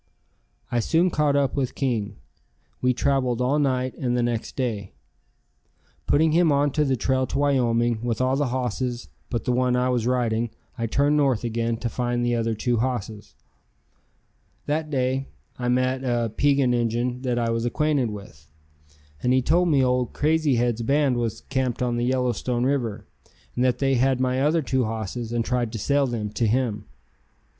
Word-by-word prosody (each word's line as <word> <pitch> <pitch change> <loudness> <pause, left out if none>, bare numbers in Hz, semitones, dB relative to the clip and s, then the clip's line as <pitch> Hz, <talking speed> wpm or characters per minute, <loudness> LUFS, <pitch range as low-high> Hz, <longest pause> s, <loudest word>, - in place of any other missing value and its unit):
I 120 - +1
soon 170 +9 +2
caught 150 -2 +2
up 140 -2 +1
with 135 -3 -1
King. 115 -7 -1 0.7
We 125 - +3
traveled 130 -2 0
all 130 +4 +1
night 130 -2 0
and 125 -2 0
the 120 - +1
next 120 -1 -2
day. 110 -7 -3 1.1
Putting 155 +2 +3
him 165 0 +4
on 145 0 +2
the 140 -2 +1
trail 130 +2 0
to 135 - -3
Wyoming 120 -5 +1
with 120 -1 -2
all 130 +1 +2
the 145 0 0
hosses 125 -1 -3 0.2
but 120 -3 -2
the 125 - +1
one 125 0 +2
I 125 0 +1
was 120 -2 0
riding, 120 -2 0 0.3
I 115 -2 -2
turned 145 +5 +2
north 135 -6 +2
again 115 0 -1
to 120 - -3
find 120 +1 -1
the 120 - +1
other 115 -1 0
two 120 +2 0
hosses. 110 -3 -3 1.3
That 155 +1 -1
day 135 -1 -1 0.3
I 125 - -2
met 130 +1 +1
a 120 -2 0
Piegan 140 -3 +3
Injun 120 +1 -1
that 125 -2 -1
I 115 -1 0
was 115 0 -1
acquainted 140 0 +1
with, 80 -8 -11 0.7
and 125 - +2
he 130 -1 +3
told 175 +5 +3
me 140 -4 +3
old 125 -1 0
Crazy 155 -2 +2
Head's 120 -1 0
band 140 +2 +2
was 115 -2 -2
camped 130 -2 -2
on 120 -1 0
the 120 - 0
Yellowstone 125 -1 0
River, 115 -6 -1 0.5
and 125 - +1
that 125 -1 +2
they 135 0 +1
had 130 0 +2
my 130 0 +1
other 155 +3 +2
two 130 -2 0
hosses 110 +1 -4
and 120 -1 -1
tried 125 -3 -1
to - - -3
sell 140 +6 +1
them 110 -4 -3
to 115 +1 0
him. 110 -3 0
125 Hz, 180 wpm, -24 LUFS, 120-135 Hz, 1.3 s, him